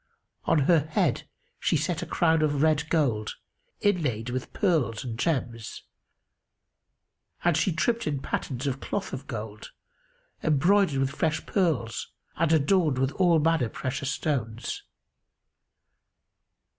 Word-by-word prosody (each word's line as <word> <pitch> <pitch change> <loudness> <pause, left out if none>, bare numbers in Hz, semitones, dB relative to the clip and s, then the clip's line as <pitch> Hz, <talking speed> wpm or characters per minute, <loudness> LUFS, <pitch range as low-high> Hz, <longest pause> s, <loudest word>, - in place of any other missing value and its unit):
On 150 - +3
her 165 +4 +5
head 155 +1 0 0.3
she - - +2
set 165 +3 -1
a - - -5
crown 160 -2 +2
of 145 -1 +1
red 155 -1 +2
gold, 125 -10 +1 0.5
inlaid 135 - 0
with 130 0 -4
pearls 145 - +1
and 120 -3 -4
gems 120 -5 -2 1.6
and 175 -2 +3
she 190 - +2
tripped 230 +7 0
in 145 -2 -1
pattens 130 0 -3
of 135 -1 -1
cloth 200 +6 -4
of 135 +1 -6
gold, 110 -2 -6 0.7
embroidered 170 +2 +3
with 135 0 +1
fresh 155 +1 -1
pearls[FN#284] 155 - 0 0.3
and 165 0 +2
adorned 160 -1 +3
with 135 +1 +1
all 175 +2 +3
manner 160 -6 +2
precious 135 +4 -3
stones. 120 -7 -2
150 Hz, 125 wpm, -27 LUFS, 130-165 Hz, 1.6 s, her